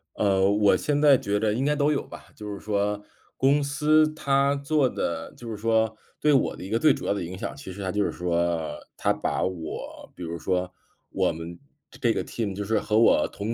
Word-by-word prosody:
呃， 95 Hz, -2 st, +3 dB
我 105 Hz, 0 st, +4 dB
现 145 Hz, -1 st, 0 dB
在 145 Hz, -3 st, +7 dB
觉 100 Hz, -3 st, -1 dB
着 105 Hz, -1 st, +2 dB
应 130 Hz, +5 st, -1 dB
该 150 Hz, -, +2 dB
都 145 Hz, +1 st, +2 dB
有 145 Hz, -, +1 dB
吧。 -, -, -12 dB
就 105 Hz, -1 st, -6 dB
是 100 Hz, -, -7 dB
说 105 Hz, 0 st, -1 dB, 0.3 s
公 140 Hz, +2 st, +3 dB
司 155 Hz, +2 st, +3 dB
它 140 Hz, -2 st, +2 dB
做 140 Hz, -1 st, +1 dB
的 85 Hz, -7 st, -3 dB
就 120 Hz, -, -9 dB
是 110 Hz, -, -5 dB
说 110 Hz, 0 st, +1 dB, 0.3 s
对 150 Hz, -, +4 dB
我 135 Hz, -, +2 dB
的 -, -, -9 dB
一 95 Hz, -, -7 dB
个 115 Hz, +2 st, +1 dB
最 155 Hz, +1 st, +5 dB
主 -, -, -7 dB
要 -, -, +1 dB
的 100 Hz, -, -3 dB
影 90 Hz, +2 st, -6 dB
响， -, -, -5 dB
其 140 Hz, -9 st, -9 dB
实 100 Hz, -, -8 dB
它 95 Hz, -, -2 dB
就 105 Hz, +2 st, +1 dB
是 -, -, -1 dB
说， 85 Hz, -2 st, -1 dB, 0.2 s
它 -, -, +1 dB
把 -, -, -1 dB
我 85 Hz, -4 st, -5 dB
比 90 Hz, -, -8 dB
如 85 Hz, 0 st, -5 dB
说 90 Hz, 0 st, -1 dB, 0.4 s
我 -, -, +1 dB
们 80 Hz, +2 st, -8 dB, 0.3 s
这 -, -, -15 dB
这 120 Hz, -3 st, +2 dB
个 -, -, -2 dB
team 105 Hz, -5 st, -4 dB
就 105 Hz, -, -3 dB
是 110 Hz, +2 st, +1 dB
和 105 Hz, 0 st, 0 dB
我 115 Hz, -, +5 dB
同 105 Hz, +3 st, -4 dB
105 Hz, 260 characters per minute, -26 LUFS, 95-140 Hz, 0.4 s, 在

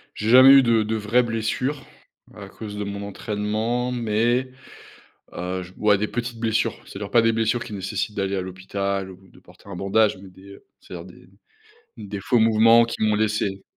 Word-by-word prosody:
J'ai 105 Hz, -, -3 dB
jamais 130 Hz, +3 st, +9 dB
eu 135 Hz, -1 st, +8 dB
de 115 Hz, -2 st, +2 dB
de 110 Hz, +1 st, -2 dB
vraies 110 Hz, +3 st, +1 dB
blessures 120 Hz, +5 st, -3 dB, 0.5 s
à 100 Hz, -2 st, -10 dB
cause 105 Hz, +1 st, -9 dB
de 105 Hz, -, -3 dB
mon 100 Hz, 0 st, -6 dB
entraînement, 110 Hz, +4 st, -3 dB
mais 120 Hz, +2 st, 0 dB, 0.8 s
heu, 90 Hz, +1 st, -4 dB
j 90 Hz, -, -14 dB
ouais, 105 Hz, -2 st, +3 dB
des 105 Hz, -, -1 dB
petites 120 Hz, +1 st, -5 dB
blessures, 110 Hz, -1 st, -1 dB
c'est-à-dire, 100 Hz, +1 st, -8 dB
pas 120 Hz, -, +4 dB
des 115 Hz, 0 st, +2 dB
blessures 115 Hz, +2 st, 0 dB
qui 120 Hz, -, -10 dB
nécessitent 95 Hz, +1 st, -4 dB
d'aller 100 Hz, 0 st, -1 dB
à -, -, -1 dB
l'hôpital 95 Hz, +1 st, -4 dB
ou 95 Hz, +1 st, -15 dB
de -, -, -20 dB
porter -, -, -19 dB
un 100 Hz, -, -7 dB
bandage 100 Hz, +3 st, +1 dB
mais 95 Hz, 0 st, -13 dB
des 100 Hz, +2 st, -15 dB, 0.2 s
c'est-à-dire 85 Hz, -1 st, -10 dB
des 90 Hz, 0 st, -16 dB, 0.7 s
des 105 Hz, -3 st, -7 dB
faux 120 Hz, +4 st, +1 dB
mouvements 115 Hz, +1 st, +5 dB
qui 115 Hz, -, -5 dB
m'ont 105 Hz, -1 st, +2 dB
laissé 105 Hz, -2 st, -1 dB
105 Hz, 185 wpm, -23 LUFS, 100-115 Hz, 0.8 s, jamais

